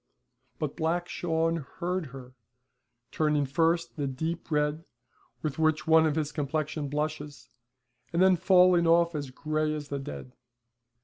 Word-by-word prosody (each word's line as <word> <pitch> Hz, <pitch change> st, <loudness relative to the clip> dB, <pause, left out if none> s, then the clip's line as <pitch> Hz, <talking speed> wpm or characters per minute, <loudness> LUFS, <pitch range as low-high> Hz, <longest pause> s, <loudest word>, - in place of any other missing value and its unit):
But 150 Hz, -2 st, -3 dB
Black 170 Hz, +2 st, -1 dB
Shawn 165 Hz, -1 st, 0 dB, 0.2 s
heard 180 Hz, -1 st, -2 dB
her, 130 Hz, -1 st, -11 dB, 0.8 s
turning 150 Hz, -2 st, +1 dB
first 165 Hz, +5 st, 0 dB
the 145 Hz, -2 st, -1 dB
deep 160 Hz, +7 st, -4 dB
red 150 Hz, +1 st, 0 dB, 0.6 s
with 155 Hz, -1 st, -3 dB
which 155 Hz, -1 st, +2 dB
one 160 Hz, 0 st, +5 dB
of 150 Hz, -, -1 dB
his 150 Hz, -2 st, -1 dB
complexion 150 Hz, 0 st, -2 dB
blushes, 150 Hz, -2 st, -4 dB, 0.6 s
and 170 Hz, -, -1 dB
then 190 Hz, 0 st, +6 dB
falling 180 Hz, -1 st, +4 dB
off 170 Hz, +1 st, +4 dB
as 145 Hz, -3 st, -4 dB
gray 155 Hz, +3 st, -1 dB
as 145 Hz, -1 st, -7 dB
the 140 Hz, -, -3 dB
dead. 135 Hz, -2 st, -8 dB
155 Hz, 140 wpm, -28 LUFS, 145-165 Hz, 0.8 s, then